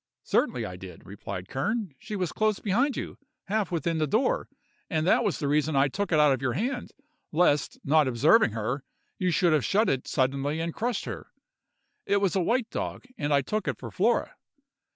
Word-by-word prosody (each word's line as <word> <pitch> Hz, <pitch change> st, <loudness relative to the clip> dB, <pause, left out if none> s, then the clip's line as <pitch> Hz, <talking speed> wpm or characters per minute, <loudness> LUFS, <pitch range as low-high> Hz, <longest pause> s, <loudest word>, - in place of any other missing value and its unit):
'Certainly -, -, +1 dB
I 90 Hz, -, -7 dB
did,' 95 Hz, 0 st, -11 dB
replied 100 Hz, -2 st, -7 dB
Kern, 205 Hz, -, -2 dB
'she 210 Hz, 0 st, -6 dB
was 185 Hz, -4 st, -1 dB
close 215 Hz, -2 st, +1 dB
behind 245 Hz, +8 st, +1 dB
you—half 220 Hz, -, -4 dB
within 165 Hz, -1 st, -1 dB
the 155 Hz, -, +1 dB
door—and 165 Hz, -, -2 dB
that 225 Hz, +6 st, +4 dB
was 200 Hz, -, 0 dB
the 145 Hz, -, -2 dB
reason 150 Hz, +1 st, +1 dB
I 135 Hz, +1 st, +4 dB
took 200 Hz, +6 st, -3 dB
it 155 Hz, -, +4 dB
out 150 Hz, -2 st, +6 dB
of 130 Hz, -, -3 dB
your 130 Hz, -2 st, 0 dB
hand, 245 Hz, -, -2 dB, 0.4 s
lest, 155 Hz, -3 st, +2 dB
not 150 Hz, 0 st, +4 dB
observing 130 Hz, -, +4 dB
her, 120 Hz, +5 st, -2 dB, 0.4 s
you 185 Hz, -, +1 dB
should 175 Hz, -1 st, +3 dB
have 150 Hz, -4 st, +2 dB
shut 215 Hz, +3 st, +2 dB
it 130 Hz, -1 st, -1 dB
suddenly 140 Hz, +3 st, 0 dB
and 165 Hz, 0 st, -2 dB
crushed 235 Hz, -1 st, -2 dB
her. -, -, -6 dB, 0.8 s
It 200 Hz, -, +3 dB
was 195 Hz, -2 st, +1 dB
a 190 Hz, -, +2 dB
white 235 Hz, +5 st, 0 dB
dog, -, -, -4 dB
and 145 Hz, -6 st, -2 dB
I 140 Hz, -1 st, +4 dB
took 215 Hz, +9 st, -2 dB
it -, -, -1 dB
for -, -, -8 dB
Flora. -, -, +1 dB
165 Hz, 195 wpm, -27 LUFS, 140-210 Hz, 0.8 s, out